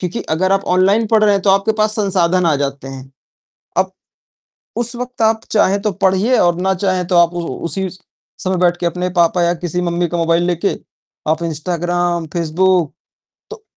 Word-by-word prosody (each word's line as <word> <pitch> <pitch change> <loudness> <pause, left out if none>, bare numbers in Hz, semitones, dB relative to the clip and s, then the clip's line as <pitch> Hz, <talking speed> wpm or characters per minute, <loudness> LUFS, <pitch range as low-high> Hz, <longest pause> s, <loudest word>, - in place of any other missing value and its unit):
क्योंकि 180 +5 -3
अगर 185 +4 +1
आप 195 - +1
ऑनलाइन 200 +5 +3
पढ़ 220 0 +2
रहे 205 - +4
हैं 195 -1 0
तो 200 - +3
आपके 195 +3 +2
पास 215 0 +1
संसाधन 185 -3 +1
आ 155 - +3
जाते 140 -1 -4
हैं। 135 0 -9 0.7
अब - - +1 0.9
उस 240 +1 -3
वक़्त 250 -1 -5
आप 220 0 +3
चाहे 200 -2 +3
तो 210 - +1
पढ़िए 195 +6 +2
और 175 0 +2
ना 190 +1 +1
चाहे 185 -1 +1
तो 180 0 0
आप 170 0 +4
उ 175 - -3 0.2
उसी 190 +4 -2 0.5
समय 185 0 0
बैठ 175 -1 +2
के 175 - 0
अपने 180 +2 -1
पापा 170 +1 +3
या 170 +1 +2
किसी 175 +1 -3
मम्मी 175 0 0
का 175 - -3
मोबाइल 165 +1 +2
लेके, 180 +2 0 0.6
आप 160 +2 0
इंस्टाग्राम, 175 +1 -2
फ़ेसबुक 170 +1 +1 0.6
तो 445 -1 -10
180 Hz, 185 wpm, -17 LUFS, 170-195 Hz, 0.9 s, रहे